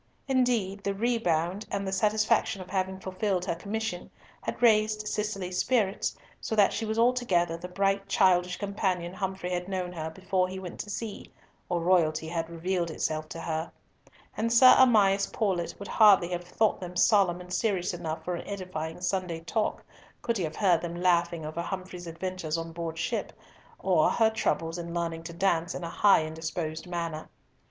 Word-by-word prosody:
Indeed 240 Hz, -7 st, +1 dB
the 200 Hz, 0 st, -1 dB
rebound, 195 Hz, -4 st, 0 dB
and 200 Hz, -1 st, -2 dB
the -, -, -2 dB
satisfaction 215 Hz, +1 st, +2 dB
of 185 Hz, -, -9 dB
having 190 Hz, -1 st, -1 dB
fulfilled 190 Hz, -1 st, -1 dB
her 180 Hz, -, 0 dB
commission, 200 Hz, +1 st, -4 dB, 0.3 s
had -, -, -4 dB
raised 215 Hz, -2 st, +3 dB
Cicely's 195 Hz, -4 st, -2 dB
spirits, 215 Hz, -7 st, +1 dB, 0.2 s
so 220 Hz, -, -3 dB
that 205 Hz, -2 st, +4 dB
she 225 Hz, -, -2 dB
was 220 Hz, +1 st, -2 dB
altogether 230 Hz, -9 st, +2 dB
the 170 Hz, +2 st, -7 dB
bright 195 Hz, +2 st, 0 dB
childish 180 Hz, -2 st, +3 dB
companion 190 Hz, -4 st, -2 dB
Humfrey 190 Hz, -1 st, -3 dB
had 180 Hz, 0 st, -2 dB
known 185 Hz, -2 st, -3 dB
her 160 Hz, -2 st, -4 dB
before 185 Hz, +2 st, 0 dB
he 185 Hz, +1 st, -6 dB
went 185 Hz, -2 st, -8 dB
to 210 Hz, -, -5 dB
sea, 210 Hz, 0 st, -6 dB, 0.4 s
or 175 Hz, -1 st, 0 dB
royalty 165 Hz, -3 st, +2 dB
had 165 Hz, -1 st, -3 dB
revealed 170 Hz, +1 st, -2 dB
itself 155 Hz, -1 st, -2 dB
to 165 Hz, -, -7 dB
her; 160 Hz, 0 st, -3 dB, 0.6 s
and 230 Hz, +1 st, -1 dB
Sir 255 Hz, +2 st, +8 dB
Amias 205 Hz, -6 st, +5 dB
Paulett 190 Hz, -6 st, -1 dB
would 200 Hz, -, -8 dB
hardly 200 Hz, -6 st, +6 dB
have 175 Hz, -1 st, -4 dB
thought 215 Hz, +4 st, +1 dB
them 180 Hz, -1 st, -7 dB
solemn 190 Hz, -4 st, +4 dB
and 180 Hz, 0 st, -8 dB
serious 190 Hz, -3 st, 0 dB
enough 160 Hz, -2 st, -5 dB
for 180 Hz, -, -2 dB
an 170 Hz, -, -5 dB
edifying 180 Hz, -5 st, -5 dB
Sunday 180 Hz, -3 st, -2 dB
talk 210 Hz, +6 st, -2 dB, 0.4 s
could 235 Hz, -1 st, 0 dB
he -, -, 0 dB
have 155 Hz, 0 st, -6 dB
heard 180 Hz, -5 st, +3 dB
them 175 Hz, 0 st, -5 dB
laughing 170 Hz, -2 st, +2 dB
over 155 Hz, +2 st, -4 dB
Humfrey's 185 Hz, -1 st, -6 dB
adventures 165 Hz, -1 st, -3 dB
on 165 Hz, 0 st, -5 dB
board 165 Hz, -1 st, -5 dB
ship, -, -, -2 dB, 0.4 s
or 175 Hz, -5 st, +3 dB
her 225 Hz, -1 st, +3 dB
troubles 165 Hz, -6 st, -1 dB
in 170 Hz, 0 st, -6 dB
learning 165 Hz, -1 st, -2 dB
to 170 Hz, -, -6 dB
dance 170 Hz, -1 st, 0 dB
in 180 Hz, -, -5 dB
a 170 Hz, -, -4 dB
high 200 Hz, -3 st, +5 dB
and 155 Hz, 0 st, -5 dB
disposed 160 Hz, +1 st, -4 dB
manner. 170 Hz, -3 st, -4 dB
185 Hz, 180 wpm, -28 LUFS, 170-200 Hz, 0.6 s, Sir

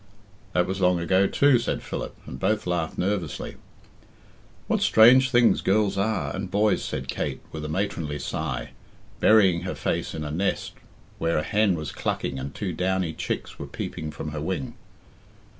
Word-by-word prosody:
"That 90 Hz, 0 st, +3 dB
was 95 Hz, +1 st, -3 dB
long 90 Hz, -1 st, +4 dB
ago 95 Hz, +3 st, +3 dB
too," 140 Hz, +1 st, +4 dB
said 120 Hz, -, -2 dB
Philip, -, -, -5 dB
and 65 Hz, -, -8 dB
both 110 Hz, +7 st, 0 dB
laughed 85 Hz, -2 st, -2 dB
nervously. 95 Hz, -3 st, -2 dB, 1.1 s
"What -, -, 0 dB
strange 125 Hz, +4 st, +7 dB
things 120 Hz, -2 st, +4 dB
girls 100 Hz, 0 st, +2 dB
are 110 Hz, +3 st, -1 dB
and 95 Hz, -1 st, -4 dB
boys!" 105 Hz, +2 st, +2 dB
said 65 Hz, -, -4 dB
Kate -, -, -3 dB
with 80 Hz, -1 st, -6 dB
a -, -, -4 dB
matronly 80 Hz, -4 st, -2 dB
sigh, 75 Hz, -2 st, -4 dB, 0.5 s
burying 95 Hz, -6 st, +5 dB
her -, -, -4 dB
face -, -, -2 dB
in 80 Hz, -, -4 dB
a 75 Hz, -, -4 dB
nest 95 Hz, +6 st, -1 dB, 0.5 s
where 80 Hz, 0 st, +1 dB
a 75 Hz, -, +1 dB
hen 105 Hz, +1 st, +2 dB
was 80 Hz, -2 st, -5 dB
clucking 65 Hz, -1 st, -2 dB
and 70 Hz, +1 st, -6 dB
two 90 Hz, +4 st, -3 dB
downy 90 Hz, -1 st, 0 dB
chicks -, -, -4 dB
were -, -, -5 dB
peeping 80 Hz, -, -5 dB
from 75 Hz, 0 st, -6 dB
her 75 Hz, 0 st, -4 dB
wing. 80 Hz, -4 st, -3 dB
90 Hz, 170 wpm, -25 LUFS, 80-105 Hz, 1.1 s, strange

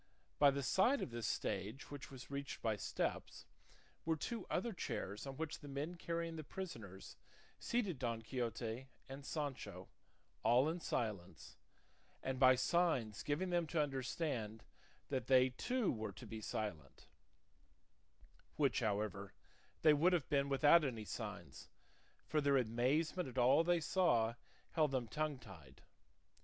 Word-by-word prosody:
By 145 Hz, -, +8 dB
the 140 Hz, 0 st, -1 dB
side 215 Hz, -, +3 dB
of -, -, -5 dB
this 115 Hz, -2 st, -3 dB
stage, 105 Hz, +10 st, -3 dB
which 145 Hz, -2 st, -7 dB
was 130 Hz, 0 st, -10 dB
reached 140 Hz, 0 st, -5 dB
by 110 Hz, -2 st, +2 dB
steps, -, -, -3 dB, 0.6 s
were 165 Hz, 0 st, +1 dB
two 225 Hz, +6 st, -4 dB
other 225 Hz, +6 st, 0 dB
chairs 105 Hz, -, -4 dB
on 135 Hz, -1 st, -6 dB
which 160 Hz, -1 st, -3 dB
the 145 Hz, -, -10 dB
men 140 Hz, +5 st, -3 dB
carrying 170 Hz, -1 st, -3 dB
the 155 Hz, -, -5 dB
prisoners 115 Hz, -, -7 dB, 0.4 s
seated 205 Hz, -, -1 dB
Don 115 Hz, -2 st, -2 dB
Quixote 120 Hz, +1 st, -3 dB, 0.2 s
and 135 Hz, +2 st, -8 dB
Sancho, 130 Hz, -, -4 dB, 0.5 s
all 125 Hz, +4 st, +5 dB
in 165 Hz, +3 st, -1 dB
silence, 105 Hz, -, -3 dB, 0.7 s
and 130 Hz, -1 st, -2 dB
by 130 Hz, -1 st, +8 dB
signs 130 Hz, -8 st, +1 dB
giving 165 Hz, +8 st, -1 dB
them 175 Hz, -2 st, +1 dB
to 165 Hz, +1 st, -1 dB
understand 130 Hz, -6 st, -2 dB, 0.5 s
that 130 Hz, -3 st, -1 dB
they 130 Hz, -1 st, +6 dB
too 240 Hz, -, 0 dB
were 110 Hz, -3 st, -4 dB
to -, -, -10 dB
be 110 Hz, -1 st, -6 dB
silent; 95 Hz, -10 st, -5 dB, 1.5 s
which, 140 Hz, -4 st, +2 dB
however, 100 Hz, -3 st, -1 dB, 0.5 s
they 155 Hz, -1 st, +8 dB
would 170 Hz, +5 st, +4 dB
have 170 Hz, -6 st, +1 dB
been 140 Hz, -2 st, +2 dB
without 145 Hz, +4 st, +6 dB
any 115 Hz, -6 st, -2 dB
signs, 105 Hz, -, -6 dB, 0.6 s
for 155 Hz, 0 st, +2 dB
their 140 Hz, -1 st, +4 dB
amazement 135 Hz, +8 st, +1 dB
at 130 Hz, -, -11 dB
all 130 Hz, +6 st, +6 dB
they 175 Hz, 0 st, +3 dB
saw 140 Hz, -9 st, +3 dB, 0.4 s
held 155 Hz, -2 st, +3 dB
them 130 Hz, -3 st, -1 dB
tongue 150 Hz, +3 st, -1 dB
tied. 90 Hz, -, -14 dB
135 Hz, 145 wpm, -38 LUFS, 110-160 Hz, 1.5 s, By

